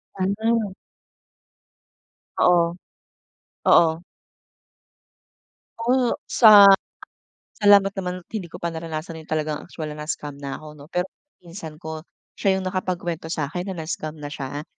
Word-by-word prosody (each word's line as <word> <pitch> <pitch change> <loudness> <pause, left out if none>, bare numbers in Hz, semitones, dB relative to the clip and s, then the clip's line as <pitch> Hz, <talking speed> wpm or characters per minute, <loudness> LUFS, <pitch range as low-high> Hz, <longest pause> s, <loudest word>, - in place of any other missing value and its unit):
Ano. 205 +2 0 1.6
Oo. 170 -1 +4 0.9
Oo. 165 -1 +5 1.8
O 245 +1 +1
sa 210 -4 +8 1.0
salamat 200 -1 +6
naman 180 -2 -4
at - - -68
hindi 200 -6 -4
ko - - -8
pa 170 0 -3
naranasan 160 0 -6
yung 160 - -16
talagang 155 -1 -1
actual 155 -4 -7
na 150 0 -7
na-scam 150 -1 -5
na 140 -1 -5
ako 155 - -12
'no. 145 -1 -13
Pero 180 +1 -1 0.3
pinsan 170 -3 -9
ko, 160 -1 -7 0.3
siya 190 -1 +1
yung 190 - -5
nakapagkuwento 180 -3 -3
sa'kin 170 +4 -3
na 175 -4 -5
na-scam 155 -1 -5
na 145 -1 -7
siya. 145 +1 -5
170 Hz, 125 wpm, -23 LUFS, 155-190 Hz, 1.8 s, sa